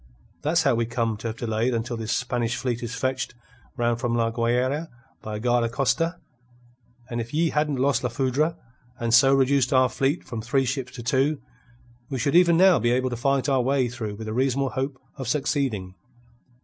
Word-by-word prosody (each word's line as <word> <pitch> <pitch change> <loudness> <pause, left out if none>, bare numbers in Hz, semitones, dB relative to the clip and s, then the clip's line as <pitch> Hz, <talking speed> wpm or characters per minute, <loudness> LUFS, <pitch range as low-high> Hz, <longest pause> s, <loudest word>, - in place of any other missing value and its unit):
That's 160 +2 +2
how 135 - +3
we 115 -1 0
come 115 -2 -1
to 115 - -5
have 115 0 -5
delayed 115 +1 0
until 120 +2 -2
this 115 0 -4
Spanish 120 -1 -1
fleet 120 -2 -2
is 120 0 -5
fetched 130 -1 -2 0.4
round 120 -1 +1
from 120 -1 -1
La 115 -1 +1
Guayra 125 +7 0 0.3
by 110 -1 -5
a - - -4
guarda 120 0 +1
costa; 165 +7 0 0.9
and 120 -2 -3
if 115 +5 -7
ye 165 +1 +2
hadn't 150 -1 0
lost 135 +2 +1
La 125 - 0
Foudre, 135 +7 0 0.4
and 115 -1 -1
so 135 +3 +7
reduced 135 -1 +3
our 130 -1 +4
fleet 135 +5 0
from 115 -3 -6
three 130 +4 +1
ships 130 0 -3
to 120 - -8
two, 135 +4 +1 0.7
we 135 - -3
should 140 +3 0
even 170 -1 +6
now 185 -4 +6
be 120 +1 +1
able 130 +1 +1
to - - -2
fight 135 +2 +1
our 135 -2 +3
way 130 0 +1
through 115 -4 -5
with 110 +1 -8
a 110 - -3
reasonable 135 +2 +1
hope 135 0 -3 0.2
of 135 - -5
succeeding. 130 -9 -1
125 Hz, 200 wpm, -25 LUFS, 115-140 Hz, 0.9 s, so